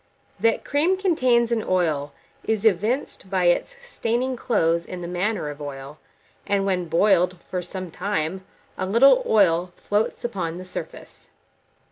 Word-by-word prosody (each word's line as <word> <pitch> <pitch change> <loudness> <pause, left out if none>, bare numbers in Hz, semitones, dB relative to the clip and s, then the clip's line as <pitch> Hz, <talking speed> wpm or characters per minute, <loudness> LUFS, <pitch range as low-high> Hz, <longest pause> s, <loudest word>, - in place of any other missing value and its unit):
That 225 +3 +1
cream 320 +6 +2
contains 255 -11 +2
an 225 -2 +1
oil, 155 -6 0 0.3
is 220 -1 -1
evinced 215 +1 0
by 185 -1 0
its 175 - +2
staining 255 - -1
clothes 170 -9 +1
in 180 0 -7
the - - -4
manner 180 -2 -2
of 145 +1 -11
oil; 140 +1 -8 0.5
and 200 -1 +1
when 185 -2 0
boiled 180 +1 +2
for 180 +1 -5
some 180 0 -7
time, 185 -1 -2 0.4
a 185 - -1
little 270 - +6
oil 180 -4 +3
floats 210 +3 -1
upon 175 -8 -3
the 185 - -8
surface. 185 - -9
190 Hz, 145 wpm, -23 LUFS, 170-230 Hz, 0.5 s, little